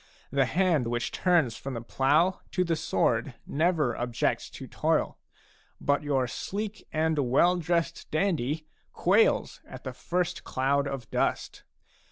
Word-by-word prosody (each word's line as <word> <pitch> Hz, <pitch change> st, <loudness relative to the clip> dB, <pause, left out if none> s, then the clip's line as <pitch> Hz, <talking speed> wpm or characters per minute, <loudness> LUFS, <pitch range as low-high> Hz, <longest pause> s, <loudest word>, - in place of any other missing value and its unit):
The 135 Hz, 0 st, +3 dB
hand 165 Hz, -4 st, +2 dB
which 120 Hz, 0 st, -2 dB
turns 165 Hz, -11 st, +2 dB
from 135 Hz, -2 st, -6 dB
the 115 Hz, -, -4 dB
plough 150 Hz, +10 st, +2 dB
to 185 Hz, -, +2 dB
the 170 Hz, -2 st, 0 dB
sword 120 Hz, -5 st, 0 dB
never 155 Hz, -5 st, +1 dB
objects 120 Hz, -1 st, -1 dB
to -, -, -9 dB
toil; -, -, 0 dB, 0.6 s
but 145 Hz, 0 st, +1 dB
your 140 Hz, -3 st, +1 dB
sleek 210 Hz, -, -5 dB
and 160 Hz, 0 st, +1 dB
well 175 Hz, +8 st, +4 dB
dressed 170 Hz, 0 st, -1 dB
dandy 155 Hz, -4 st, 0 dB, 0.3 s
quails 455 Hz, +2 st, +2 dB
at -, -, -11 dB
the -, -, -5 dB
first 180 Hz, 0 st, -2 dB
cloud 140 Hz, +2 st, 0 dB
of 135 Hz, -4 st, -5 dB
dust. -, -, -1 dB
155 Hz, 140 wpm, -28 LUFS, 135-175 Hz, 0.6 s, well